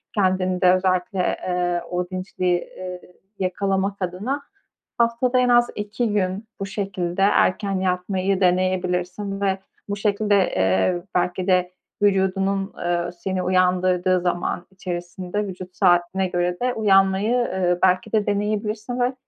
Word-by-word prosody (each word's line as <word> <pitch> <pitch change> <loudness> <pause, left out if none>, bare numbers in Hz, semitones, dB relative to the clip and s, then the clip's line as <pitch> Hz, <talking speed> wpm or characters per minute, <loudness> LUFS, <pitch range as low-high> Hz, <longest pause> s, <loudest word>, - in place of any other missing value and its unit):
kendinde 185 -2 +3
özellikle, 185 0 0 0.3
eee, 175 -1 0
o 180 0 -2
dinçliği, 185 -1 -1 0.2
eee, 180 -1 -6 0.4
yakalamak 195 +1 -1
adına 200 +11 -2 0.6
haftada 235 +2 +2
en 250 0 +3
az 240 0 +5
2 210 +3 -2
gün 195 +1 -1
bu 195 - -2
şekilde 195 -3 -3
erken 195 0 +2
yatmayı 185 +1 0
deneyebilirsin. 185 +2 0
Ve 195 -1 +1 0.3
bu 200 - -1
şekilde, 205 0 +1
eee, 95 - +1
belki 180 +1 0
de 180 -1 +2 0.3
vücudunun, 195 0 +1
eee, 175 0 -1
seni 185 +1 -3
uyandırdığı 185 0 +2
zaman 175 0 -2
içerisinde 185 +2 -4
vücut 185 -1 -8
saatine 175 +2 +2
göre 175 0 -1
de 250 0 0
uyanmayı, 195 +1 +3
ııı, 185 -7 0
belki 185 +3 +3
de 215 -2 +2
deneyebilirsin 210 +3 -2
ve, 245 +1 +1
185 Hz, 125 wpm, -23 LUFS, 180-200 Hz, 0.6 s, az